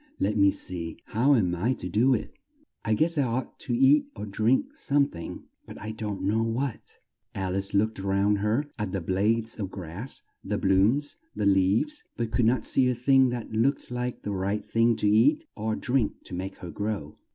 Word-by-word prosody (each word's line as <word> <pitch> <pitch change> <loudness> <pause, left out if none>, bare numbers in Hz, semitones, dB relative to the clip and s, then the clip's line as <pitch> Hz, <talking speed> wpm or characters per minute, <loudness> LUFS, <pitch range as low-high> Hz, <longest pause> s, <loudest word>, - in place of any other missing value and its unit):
Let 105 - +1
me 100 -1 +5
see 85 -4 -2
how 130 +6 +3
am 90 -7 +2
I 105 +9 +1
to 90 - -5
do 120 +8 +3
it? - - -5 0.5
I 110 - +1
guess 160 +4 +1
I - - +5
ought 130 0 -2
to - - -2
eat 275 +3 +5
or - - -5
drink 115 - +1
some 140 - +2
thing, 85 - -8 0.2
but - - -10
I 110 - -5
don't 105 -2 -5
know 105 +4 +1
what!" 115 +2 -3 0.4
Al 95 -1 -2
ice 100 +1 -2
looked 110 +2 +1
all 95 0 -3
round 100 +1 +2
her 110 +8 +1
at 105 -2 -3
the 95 - 0
blades 110 +6 0
of 100 -3 -3
grass, 95 +7 -7 0.2
the - - -2
blooms, 105 - +2 0.2
the - - -1
leaves, 100 - +2
but 115 -2 -2
could 115 0 +2
not 115 0 +2
see 130 -1 +3
a 125 - 0
thing 130 +1 +4
that 120 -2 -5
looked 125 +5 0
like 125 0 -3
the 105 - -3
right 100 +2 -2
thing 115 0 +3
to 105 - 0
eat 205 - +4
or 110 0 -2
drink 125 -3 -1
to - - -10
make 95 +2 -4
her 90 - -8
grow. 105 -8 -4
110 Hz, 205 wpm, -27 LUFS, 100-125 Hz, 0.5 s, me